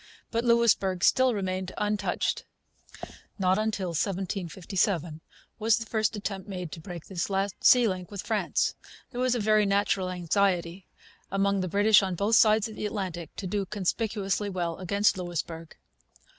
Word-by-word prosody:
But 230 0 0
Louisbourg 230 -6 +3
still 260 -1 +4
remained 185 -1 -3
untouched. 205 -3 -1 0.9
Not 185 -2 +2 0.2
till 190 -4 -3
1757 175 -1 -2 0.4
was 220 +1 +3
the 230 - -5
first 220 0 0
attempt 200 -1 -5
made 180 -4 -5
to - - -7
break 170 0 -8
this 185 -1 -3
last 195 -1 -2
sea 245 -2 +6
link 185 -3 -3
with 200 -2 -6
France. - - 0 0.4
There 245 - -4
was 255 -1 +2
a - - 0
very 215 -1 +3
natural 195 -2 +1
anxiety, 180 0 0 0.4
among 195 0 +1
the 185 - -2
British 205 +4 +5
on 190 -2 -2
both 205 +5 +2
sides 215 0 +5
of 220 - -10
the 210 - -3
Atlantic, 185 -5 -5
to 200 - -6
do 200 +2 -1
conspicuously 205 0 -1
well 175 -3 -2
against 200 +2 +1
Louisbourg. 165 -2 -5
195 Hz, 155 wpm, -27 LUFS, 180-210 Hz, 0.9 s, sea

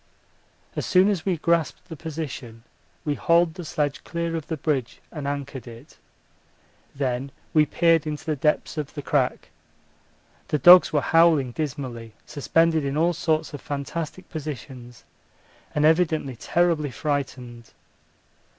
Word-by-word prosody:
As - - -2
soon 185 +2 +5
as 195 -3 -2
we 180 -3 +1
grasped 165 0 0
the 160 - -7
position, 140 -8 -7 0.4
we 150 - +1
hauled 170 +2 +3
the 175 +1 -8
sledge 150 -3 -2
clear 170 -1 -3
of 160 -3 -5
the 160 - -3
bridge 135 -5 -2
and 150 -4 -5
anchored 140 -2 -5
it. 120 +6 -13 1.0
Then 135 0 -2 0.2
we 155 -1 +4
peered 165 0 +3
into 150 -1 -5
the 155 -2 0
depths 150 +2 0
of 150 0 -6
the 145 - -5
crack. 135 -4 0 1.0
The 150 - 0
dogs 175 +6 +8
were 150 -2 +2
howling 160 -5 +4
dismally, 120 -6 -5
suspended 160 +2 +1
in 140 +1 -2
all 170 +2 +3
sorts 160 -2 -1
of 145 - -7
fantastic 155 +5 -5
positions 130 -5 -8 0.7
and 150 0 +3
evidently 155 -5 +2
terribly 165 +2 +1
frightened. 125 -4 -4
150 Hz, 140 wpm, -24 LUFS, 135-165 Hz, 1.0 s, dogs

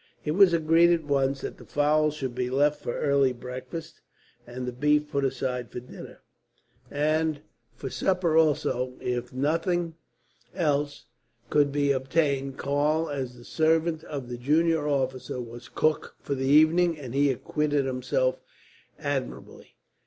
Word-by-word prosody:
It 150 - 0
was 190 +2 +6
agreed 165 +1 +4
at 170 -2 +2
once 140 -2 0
that - - -6
the - - -11
fowls 150 +1 +2
should 130 -4 -4
be 125 0 -2
left 145 +3 +2
for 120 - -3
early 140 -3 +3
breakfast; 130 +6 -8 0.5
and 125 +1 -6
the 125 - -3
beef 150 +4 +1
put 140 - 0
aside 125 -3 -2
for - - -5
dinner, 125 - -12 0.7
and 155 +1 0 0.4
for 135 - -6
supper, 180 -4 +1
also, 130 -5 +2
if 125 -1 -3
nothing 165 +5 0 0.6
else 145 -4 -1 0.5
could 145 -1 +3
be 145 0 +2
obtained. 135 0 0
Karl, 150 +3 0
as 130 -3 -4
the 120 - -14
servant 160 0 +1
of 140 -4 -6
the 120 0 -5
junior 155 +3 +2
officer, 130 -3 -1
was 120 0 -9
cook 155 -1 0
for - - -3
the 135 -1 -2
evening, 160 +4 +5
and 130 -5 -8
he 140 +1 +3
acquitted 145 +2 0
himself 315 - 0 0.6
admirably. - - -5
145 Hz, 145 wpm, -27 LUFS, 130-155 Hz, 0.7 s, was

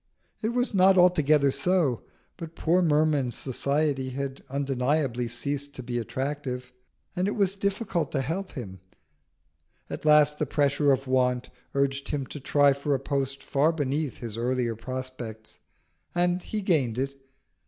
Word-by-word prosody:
It 220 - 0
was 245 0 0
not 190 0 +5
altogether 155 -6 +5
so; 145 -3 +1 0.3
but 165 -2 -9
poor 175 +3 +2
Merman's 150 -6 +2
society 140 0 0
had 135 +1 -4
undeniably 135 -2 0
ceased 140 +4 -4
to 130 - -7
be 120 0 -2
attractive, 130 0 -4 0.4
and 185 +1 0
it 205 - -1
was 195 -3 +2
difficult 200 - -1
to 135 - +1
help 175 +8 -3
him. 100 - -7 1.1
At - - -5
last 150 -1 +5
the 150 - 0
pressure 140 0 +2
of 135 0 +1
want 125 -1 +1 0.2
urged 140 0 0
him 140 -2 -2
to 150 - -6
try 145 +1 +4
for 140 +1 -1
a - - -1
post 135 0 -2
far 150 +3 +2
beneath 145 -2 -2
his 115 -2 -6
earlier 120 -1 0
prospects, 120 -2 -7 0.6
and 175 +1 +2
he 210 +2 -4
gained 140 - +2
it. 135 +1 -2
140 Hz, 150 wpm, -27 LUFS, 130-155 Hz, 1.1 s, not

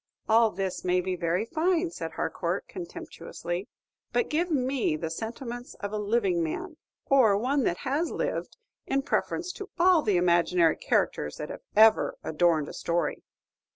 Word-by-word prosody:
"All 225 +1 +5
this 190 -2 -3
may 180 0 +2
be 185 0 -2
very 175 +4 0
fine," 335 +5 +1
said - - -6
Harcourt, - - -2
contemptuously, 190 - -6 0.4
"but 475 - 0
give 340 +4 +1
me 260 - +1
the 160 +1 -4
sentiments 240 +5 -6
of 205 0 -5
a 215 - -1
living 200 -4 +1
man, 315 - -4 0.3
or 235 -8 +5
one 260 +4 +1
that 175 - -1
has 290 +6 0
lived, - - -3 0.3
in 275 0 +1
preference 350 +5 -1
to 400 +2 -8
all 355 -1 +5
the 205 -9 +2
imaginary 175 -1 +3
characters 75 - 0
that 150 - -5
have - - -8
ever 220 +1 +5
adorned 160 -2 +2
a - - -8
story." 170 0 -1
220 Hz, 155 wpm, -28 LUFS, 175-285 Hz, 0.4 s, All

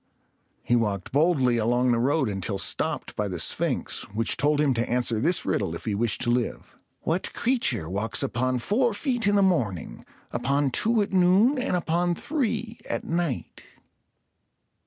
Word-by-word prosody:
He 120 - +2
walked 105 -5 -1
boldly 140 -5 +3
along 120 +3 +2
the 120 - +2
road 135 +2 +1
until 95 -1 -2
stopped - - -2
by 105 - -1
the 90 -2 -4
Sphinx, - - 0
which 115 +1 0
told 150 0 +1
him 145 -3 +3
to 115 0 -2
answer 120 -2 +1
this 170 +9 +1
riddle 80 - -1
if - - -9
he 110 - -1
wished 110 +1 -1
to 120 - +1
live: 120 -1 -2 0.3
"What 170 +4 -1
creature 230 - 0
walks 100 +3 -1
upon 130 +1 0
four 220 - +1
feet 245 -3 -1
in 205 - +3
the 200 - +4
morning, 115 - -1 0.3
upon 140 0 0
two 220 - +2
at 200 - -7
noon, 190 +9 +4
and 250 -7 0
upon 175 0 0
three 235 - -2
at - - -2
night?" 165 -6 -3
135 Hz, 165 wpm, -25 LUFS, 115-185 Hz, 0.3 s, the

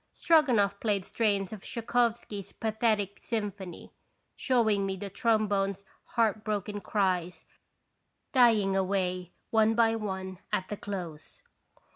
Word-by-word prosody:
Stroganoff 235 -12 +3
played 205 -4 0
strains 205 -3 0
of 210 - -8
Tschaikowsky's 230 -4 -1
pathetic 215 -3 0
symphony, 205 -6 -5 0.4
showing 220 -6 +2
me 195 0 -1
the 195 +1 -6
trom 215 +1 +2
bones' 195 -1 -1 0.3
heart 220 -2 +2
broken 210 -1 -3
cries, 185 -4 -1 0.9
dying 225 -7 +4
away, 185 -2 -1 0.2
one 220 0 +4
by 225 -1 +4
one, 190 -4 -4
at 185 - -1
the 210 - -4
close. 185 - -7
205 Hz, 115 wpm, -29 LUFS, 195-225 Hz, 0.9 s, dying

